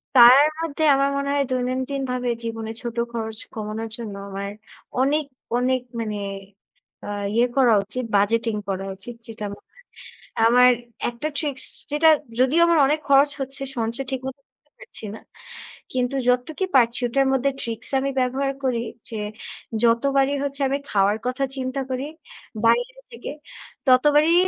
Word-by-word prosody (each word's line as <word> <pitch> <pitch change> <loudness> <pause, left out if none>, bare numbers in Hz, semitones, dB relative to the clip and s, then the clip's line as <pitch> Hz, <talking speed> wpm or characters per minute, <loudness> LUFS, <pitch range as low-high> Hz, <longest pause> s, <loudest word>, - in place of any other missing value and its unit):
পারার 255 +5 +9
মধ্যে 315 -1 -2
আমার 275 +1 +2
মনে 280 0 -1
হয় 280 -1 +2
দৈনন্দিন 255 +2 -1
ভাবে 250 -1 -1
জীবনে 225 -1 -4
ছোট 235 -1 -5 0.2
খরচ 220 -1 -4
কমানোর 220 +1 -4
জন্য 220 -4 -6
আমার 200 +1 -4 0.5
অনেক, 295 +3 +2 0.3
অনেক 255 +1 +1 0.2
মানে 215 -2 -3 0.9
আ - - -5 0.2
ইয়ে 235 +2 +4
করা 250 -4 +6
উচিত, 250 +5 -5
বাজেটিং 225 +2 +1
করা 195 0 -2
উচিত 230 +5 -9
যেটা 220 -2 -6
মনে - - -24
হয়। - - -19 0.6
আমার 250 +2 +7 0.4
একটা 240 +6 -4
ট্রিক্স 285 -4 -3 0.3
যেটা 315 +2 +5 0.3
যদিও 275 +7 +4
আমার 335 -2 +4
অনেক 305 +2 +1
খরচ 280 +1 +6
হচ্ছে 270 +1 -5 0.2
সঞ্চয় 230 +4 -2
ঠিক 265 -1 -2
মতো 265 +1 -7
করতে 280 +3 -44
পারছি - - -6
না। - - -10 0.7
কিন্তু 250 +1 0
যতটুকু 250 +9 +1
পারছি 240 -1 +4
ওটার 270 +3 +2
মধ্যে 265 +1 +2
ট্রিকস 225 -1 -5
আমি 275 +1 -1
ব্যবহার 270 +2 0
করি 240 -3 0 0.3
যে, 220 - -5 0.6
যতবারই 270 +4 +3
হচ্ছে 280 0 -3
আমি 275 - +1
খাওয়ার 200 +1 +3
কথা 255 +2 -1
চিন্তা 260 +1 -2
করি। 260 +2 -2 0.6
বাইরে 245 +3 +2
থেকে 235 +3 -7 0.6
ততবারই 295 +5 +5
255 Hz, 150 wpm, -23 LUFS, 230-275 Hz, 0.9 s, পারার